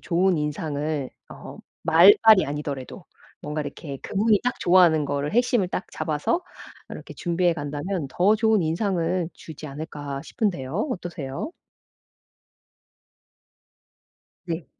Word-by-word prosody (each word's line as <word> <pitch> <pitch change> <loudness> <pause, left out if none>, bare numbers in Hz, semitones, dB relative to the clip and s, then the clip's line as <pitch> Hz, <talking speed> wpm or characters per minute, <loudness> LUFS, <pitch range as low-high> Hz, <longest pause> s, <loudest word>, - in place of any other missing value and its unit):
좋은 180 0 +1
인상을 150 -1 -3 0.2
어 - - -10 0.2
말발이 190 +5 +7
아니더라도 145 -2 -5 0.4
뭔가 150 +1 -3
이렇게 140 -1 -7
'그분이 210 +1 +2
딱 250 - -1
좋아하는 175 -4 +5
거를 145 +3 -2
핵심을 240 -4 +2
딱 180 - -3
잡아서 155 - -1 0.5
이렇게 - - -9
준비해 175 0 +1
간다면 145 +3 -3
더 200 +8 +3
좋은 220 -3 +3
인상을 175 0 0
주지 155 -1 -10
않을까?' 145 -1 -6
싶은데요. 185 - -2
어떠세요? 170 - -5 2.9
네. 170 -2 -4
165 Hz, 265 characters per minute, -24 LUFS, 145-190 Hz, 2.9 s, 말발이